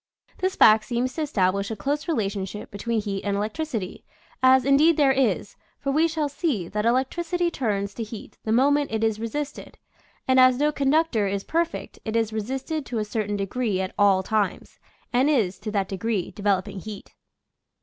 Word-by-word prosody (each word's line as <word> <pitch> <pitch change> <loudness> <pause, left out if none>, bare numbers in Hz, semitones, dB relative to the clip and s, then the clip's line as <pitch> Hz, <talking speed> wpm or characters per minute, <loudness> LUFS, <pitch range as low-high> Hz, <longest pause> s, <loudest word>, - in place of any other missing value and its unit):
This 375 0 0
fact 215 0 +6
seems 245 +3 -1
to 320 - -4
establish 200 -8 0
a 220 - -3
close 285 - -2
relation 205 - -1
ship 210 +2 -8
between 225 +3 -2
heat 200 -2 -4
and 200 -1 -1
electricity, 215 - -4 0.4
as 260 -1 +5
indeed 290 +4 +5
there 285 -3 +5
is; 245 -8 0 0.2
for 275 - -2
we 315 +4 +3
shall 310 -2 -1
see 280 - -2
that 210 +4 -1
electricity 340 +8 0
turns 205 -8 -2
to 235 - -6
heat 220 -1 -8
the 220 - -2
moment 285 +4 +3
it 220 0 -1
is 220 -1 +1
resisted, 275 +6 -5 0.5
and 260 0 +4
as 255 -1 +6
no 295 +2 +2
con 280 -2 0
ductor 295 -9 +2
is 195 0 -2
perfect 335 +1 -2
it 220 0 -4
is 225 -1 +1
resisted 265 +8 -3
to 240 - -3
a 215 - -1
certain 210 -1 -2
de 195 - -1
gree 215 -2 -1
at 190 0 -3
all 195 -2 +4
times, 210 -1 -2 0.3
and 255 +4 +3
is, 200 -11 +1
to 215 +2 -5
that 200 -2 0
degree, 200 0 -2
developing 200 -1 -1
heat. 210 +1 -9
225 Hz, 190 wpm, -24 LUFS, 205-275 Hz, 0.5 s, fact